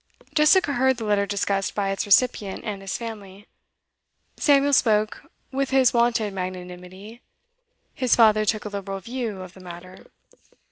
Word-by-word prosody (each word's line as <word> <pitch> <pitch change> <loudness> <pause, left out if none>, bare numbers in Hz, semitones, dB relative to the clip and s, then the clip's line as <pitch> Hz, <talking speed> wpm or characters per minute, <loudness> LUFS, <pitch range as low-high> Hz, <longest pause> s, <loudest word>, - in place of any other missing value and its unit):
Jessica 305 0 +4
heard 260 0 +2
the 225 - -5
letter 205 -1 +1
discussed 200 -1 -2
by 195 -1 -1
its 195 - -3
recipient 205 -2 +2
and 205 -3 -5
his 195 0 -4
family. 210 -4 -9 0.9
Samuel 285 -1 +3
spoke 215 -4 +1 0.3
with 275 0 -1
his 265 -2 +3
wonted 235 -3 +1
magnanimity; 185 +4 -8 0.7
his 255 -3 +1
father 215 -2 +5
took 215 0 -1
a - - -4
liberal 195 -1 -5
view 230 -3 -5
of 185 -1 -12
the 190 - -15
matter. 185 +1 -12
210 Hz, 145 wpm, -23 LUFS, 195-240 Hz, 0.9 s, father